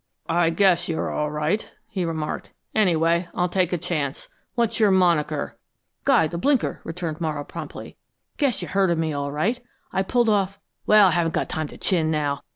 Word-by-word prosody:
"I 170 0 +3
guess 180 0 +3
you're 160 - -1
all 150 0 -1
right," 150 +8 -1 0.2
he 185 -3 -2
remarked. 160 -2 -4 0.2
"Anyway, 170 -3 +2
I'll 180 0 +1
take 180 -1 +1
a 180 - +1
chance. 155 -5 -3 0.3
What's 235 -2 +1
your 215 -2 +5
moniker?" 170 -6 +1 0.5
"Guy 255 -11 +5
the 170 +2 -4
Blinker," 275 +3 +1
returned 165 -1 -5
Morrow 155 -3 -2
promptly. - - -8 0.4
"Guess 275 -6 +1
you've - - -7
heard 195 -1 +3
of 170 - +1
me, 160 -1 -1
all 140 0 -2
right. 220 - -1 0.3
I 190 - +2
pulled 240 +4 +1
off 200 -2 +1 0.3
but 215 0 +7
I 190 -3 +6
haven't 165 -1 +1
got - - -1
time 155 -1 -2
to - - -12
chin 165 -5 +1
now. 145 -2 0
170 Hz, 185 wpm, -24 LUFS, 155-195 Hz, 0.5 s, but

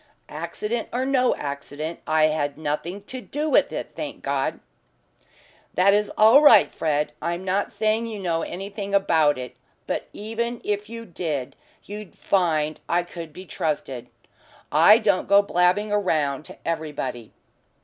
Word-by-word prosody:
"Accident 225 +2 -4
or 255 +2 -1
no 260 -2 +2
accident, 145 +3 -5
I 155 0 +3
had 155 -2 +1
nothing 160 +6 -3
to 255 +4 -7
do 295 +8 -3
with - - +3
it, - - -5
thank - - -6
God." - - -1 1.2
"That 195 +2 +5
is 210 0 +1
all 225 +7 +7
right, 230 -9 +7
Fred. 150 -1 0
I'm 170 +2 -3
not 195 +2 0
saying 220 +2 0
you 220 -2 -5
know 170 -4 -1
anything 200 +3 -4
about 160 -7 +3
it. 125 0 -7 0.3
But - - -3
even 230 +3 -4
if 210 0 -2
you 230 0 -7
did 155 - -4 0.3
you'd 210 -1 -9
find 155 -5 +1
I 175 +1 +2
could 170 -2 -9
be 185 +5 -10
trusted. 145 -6 -3 0.6
I 165 +9 +7
don't 205 -5 +1
go 200 0 +6
blabbing 200 +3 +2
round 155 -9 0
to - - -12
everybody." 145 -8 -4
185 Hz, 150 wpm, -24 LUFS, 155-210 Hz, 1.2 s, all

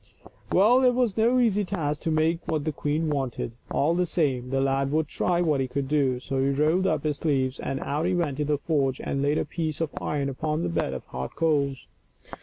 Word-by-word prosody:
Well, 235 +8 +5
it 250 -1 +4
was 245 -6 +1
no 235 +3 +3
easy 215 -5 +3
task 155 -7 -2
to - - -2
make 160 +1 +2
what 155 -2 -1
the 155 - 0
queen 150 +2 -1
wanted; 135 -5 -2 0.2
all 155 +4 +2
the 180 +1 +1
same, 130 -8 0
the 135 +1 0
lad 135 0 +1
would 155 0 +1
try 175 +3 0
what 150 -5 +2
he 130 - -1
could 135 +1 -3
do. 135 -3 +1
So 135 +1 -3
he 135 +1 +2
rolled 155 +7 +2
up 155 -5 0
his 150 -2 -1
sleeves 135 -4 0
and 135 - -3
out 150 +4 -1
he 185 - +1
went 150 -5 -1
into 150 - +1
the - - +1
forge 140 -3 0
and 135 - -2
laid 145 +2 +1
a - - 0
piece 160 -3 -3
of 165 -3 -1
iron 145 -2 -1
upon 150 +4 -2
the - - -1
bed 85 0 -1
of - - -7
hot 65 +1 -6
coals. 140 -5 0
150 Hz, 230 wpm, -26 LUFS, 135-165 Hz, 0.2 s, Well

